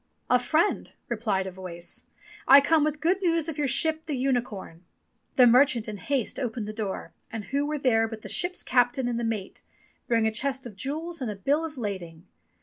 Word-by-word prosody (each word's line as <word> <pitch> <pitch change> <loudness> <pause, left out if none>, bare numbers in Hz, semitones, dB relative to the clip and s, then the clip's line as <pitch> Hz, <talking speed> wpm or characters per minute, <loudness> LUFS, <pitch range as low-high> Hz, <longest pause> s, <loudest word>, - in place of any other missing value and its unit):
"A 250 - +6
friend," 315 +10 +1 0.2
replied 215 -5 -1
a 190 - -5
voice. 180 -2 -8 0.4
"I 275 +2 +10
come 305 +2 +3
with 300 0 -1
good 360 +5 +2
news 335 -3 +1
of 315 -2 -5
your 290 - +1
ship 315 +4 +2
the 295 -4 -2
Unicorn.^' 245 -10 -2 0.5
The 255 - +7
merchant 245 -1 +5
in 210 -1 -5
haste 255 +5 -2
opened 230 -4 -3
the 215 - -5
door, 210 -3 -4 0.2
and 225 -3 -5
who 280 +2 -1
were 300 0 -1
there 225 -5 +2
but 220 -1 -8
the - - -7
ship's 360 0 0
captain 245 +1 +2
and 240 -1 -1
the - - -2
mate, 220 -4 -3 0.5
bearing 230 -2 +2
a 220 - +2
chest 265 +3 -2
of 225 -5 -8
jewels 310 - -4
and 250 - -2
a 210 - -4
bill 280 - +1
of 315 -3 -6
lading. 180 -7 -5
245 Hz, 205 wpm, -27 LUFS, 215-290 Hz, 0.5 s, I